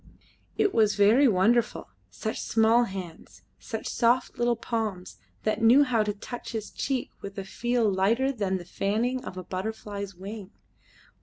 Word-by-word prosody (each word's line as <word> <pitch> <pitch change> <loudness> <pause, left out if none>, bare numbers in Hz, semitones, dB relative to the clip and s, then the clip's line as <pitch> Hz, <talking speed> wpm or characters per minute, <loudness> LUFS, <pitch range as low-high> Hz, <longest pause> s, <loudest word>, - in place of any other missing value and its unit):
It 405 - +2
was 215 -2 +3
very 220 +7 +5
wonderful 230 +3 +2 0.2
such 220 - -4
small 225 +2 +3
hands, 170 - -9 0.2
such 225 -1 -6
soft 240 +2 +1
little 240 0 +2
palms 220 -6 -4 0.3
that 215 +1 0
knew 240 +6 +7
how 245 -5 +1
to 210 -1 0
touch 235 +5 -8
his 220 -2 -4
cheek 270 -3 -2
with 200 0 -8
a 195 - -3
feel 240 +3 0
lighter 215 +8 +2
than 200 -7 -1
the 175 - -9
fanning 225 +8 -1
of 185 - -8
a 185 - -5
butterfly's 200 +1 -5
wing. 195 +2 -8
220 Hz, 155 wpm, -27 LUFS, 195-240 Hz, 0.3 s, knew